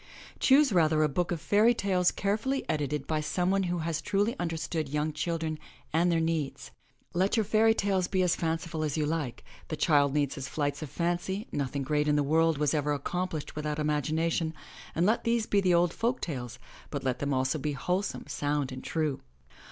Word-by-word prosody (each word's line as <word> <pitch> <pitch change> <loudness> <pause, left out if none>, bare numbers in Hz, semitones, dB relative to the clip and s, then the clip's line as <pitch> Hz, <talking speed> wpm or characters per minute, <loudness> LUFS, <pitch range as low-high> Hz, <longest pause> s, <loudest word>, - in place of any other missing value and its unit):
Choose 270 -2 +5
rather 155 -3 +4
a - - +4
book 170 +5 -1
of 170 - -1
fairy 210 +8 +4
tales 185 -4 +2
carefully 220 +7 -1
edited 150 -2 -1
by 155 -1 -1
someone 180 +5 +1
who 175 - 0
has 165 -1 -1
truly 205 +4 0
understood 165 -3 -2
young 150 +2 -1
children 160 0 -2 0.3
and 170 +2 +3
their 165 - +2
needs. 160 -4 -2 0.4
Let 190 +6 +2
your 220 - +3
fairy 220 +2 +4
tales 190 -4 +1
be 185 -1 +1
as 180 - +2
fanciful 165 -1 -2
as 150 -1 -1
you 150 - +1
like 150 -5 -3
— - - -22
the 155 - -3
child 145 -4 +3
needs 145 -2 +1
his 135 -1 -5
flights 145 0 -2
of 155 - -5
fancy; 175 - -2
nothing 140 0 -2
great 150 +2 +1
in 150 - +3
the 145 - +3
world 160 +2 +3
was 150 0 +1
ever 150 -1 +1
accomplished 160 +2 -3
without 150 0 -2
imagination, 160 +2 0 0.4
and 170 - +2
let 220 +4 +2
these 230 -1 +1
be 200 -2 +2
the 180 -2 +3
old 175 0 +3
folk 235 +3 0
tales, 125 -7 -5 0.3
but - - -4
let 130 -2 -1
them 140 - -2
be 140 - +1
also 130 +3 0
wholesome, 180 +8 -2
sound 145 -2 -1
and 130 0 -7
true. 155 -4 -1
160 Hz, 200 wpm, -29 LUFS, 150-185 Hz, 0.4 s, Choose